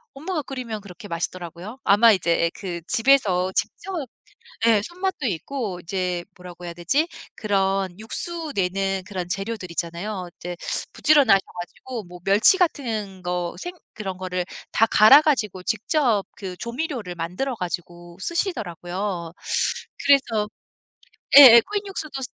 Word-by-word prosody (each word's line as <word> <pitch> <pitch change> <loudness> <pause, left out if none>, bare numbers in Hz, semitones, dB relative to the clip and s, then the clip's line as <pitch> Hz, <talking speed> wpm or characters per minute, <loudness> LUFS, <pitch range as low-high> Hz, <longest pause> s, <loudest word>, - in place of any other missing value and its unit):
엄마가 315 +3 -3
끓이면 250 -6 -6
그렇게 200 +2 -11
맛있더라고요. 175 +4 -5
아마 220 +3 +6
이제 170 -3 +2
그 175 -4 -5
집에서 215 -8 +3
직접 385 +2 -2 0.7
예. 220 -3 +5
손맛도 360 - -3
있고 205 - -3
이제 180 0 -2
뭐라고 180 -1 -11
해야 170 - -5
되지 225 - +1 0.3
그런 195 -3 0
육수 320 +8 -5
내는 195 0 0
그런 185 -4 -4
재료들 195 -1 -4
있잖아요. 180 +3 -4
이제 175 0 -6 0.4
부지런하셔 285 -10 +5
가지고 220 +7 -7
뭐 180 -1 -12
멸치 210 - +5
같은 225 - -1
거 175 -1 -2
생 355 0 -6 0.2
그런 190 -4 -5
거를 185 -1 -3 0.3
다 225 - +4
갈아 225 +7 +8
가지고 215 -12 0
직접 225 - +1
그 190 -3 -7
조미료를 235 - -4
만들어 180 +11 -3
가지고 175 -2 -6
쓰시더라고요. 185 - -3 0.7
그래서 230 -7 +3 0.9
예예 235 -5 +11
코인 410 0 -4
육수도 310 -8 -5
200 Hz, 300 characters per minute, -23 LUFS, 180-260 Hz, 0.9 s, 예예